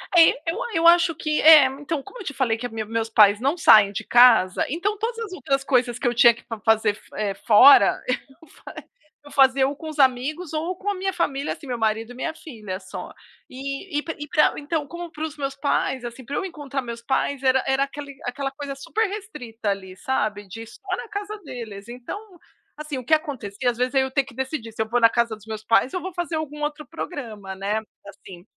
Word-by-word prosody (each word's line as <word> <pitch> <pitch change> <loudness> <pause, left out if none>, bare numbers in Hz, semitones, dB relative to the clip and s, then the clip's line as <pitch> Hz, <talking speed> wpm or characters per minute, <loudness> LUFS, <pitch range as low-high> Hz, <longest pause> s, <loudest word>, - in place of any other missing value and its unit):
É, 330 -1 +8 0.2
eu 420 +9 -5
a - - -4
eu 330 +1 +4
acho 340 0 +5
que 305 -1 -1
é, 310 -2 +9
então 285 +3 -3
como 485 - -12
eu - - -7
te 285 - -4
falei 245 -5 0
que 245 - -6
a - - -3
minha 220 -1 -5
meu 220 - -12
meus 225 0 -1
pais 210 -1 +5
não 275 +5 +1
saem 215 - +7
de 200 - -5
casa, 240 -6 +5
então 390 +9 -2
todas 455 +3 -3
as 450 -4 -5
outras 275 -4 -1
coisas 250 -3 +1
que - - -1
eu 240 - +1
tinha 235 0 +6
que 235 - -17
fa 225 -2 -7
fazer, 220 -1 +2 0.2
eh, 205 -2 -1
fora, 250 +6 +7
eu 270 +5 -5
fa - - -13 0.5
eu 290 - -14
fazia 265 -1 +4
ou 280 - -4
com 315 - -9
os 310 -1 -7
amigos 275 +6 +1
ou 320 +4 -2
com 390 +3 -4
a 405 - -1
minha 380 +1 -2
família, 290 -5 -1
assim, 290 - -13
meu 245 -2 -3
marido 225 +1 -1
e - - -11
minha 315 +6 -3
filha 215 - -8
só. 190 - -9 0.4
E 275 +6 -5
e - - -6
pa 325 - -5
e 295 - -7
pra 300 +1 +3
então 295 0 -3
como 345 +2 -8
pros 310 -1 -6
meus 275 -1 -3
pais, 275 -2 -1
assim, 240 +1 -8
pra 280 - -5
eu - - -1
encontrar 290 -6 -5
meus 235 -2 -7
pais 265 +2 -1
era 260 0 +3
era 270 +1 +2
aquele 280 0 -7
aquela 270 +2 -3
coisa 280 0 -7
super 425 +11 -1
restrita, 250 - -6
ali, 190 -2 -4
sabe, 210 -2 -2
de 225 +4 -8
só 370 - -6
na - - -7
casa 415 0 -5
deles, 230 -7 -8
então, 245 +10 -7 0.6
assim, 300 -2 -6
o 255 - -7
que 315 - +1
acontecia 260 -7 -1
às 240 - -3
vezes, 250 +1 -1
eu 265 -1 +2
ter 275 +1 +2
que 270 - -15
decidir 265 -3 -4
se 220 - -3
eu 220 - -2
vou 245 +2 +2
na 230 -1 +6
casa 235 -1 0
dos 215 -1 -19
meus 220 -1 -6
pais 230 +4 +2
ou 365 - -2
vou 375 +2 -6
fazer 345 -1 -3
algum 300 -1 -5
outro 295 0 -3
programa, 230 - -7
né? 200 +3 -1 0.3
Assim. 190 -2 -13
270 Hz, 235 wpm, -23 LUFS, 230-310 Hz, 0.6 s, é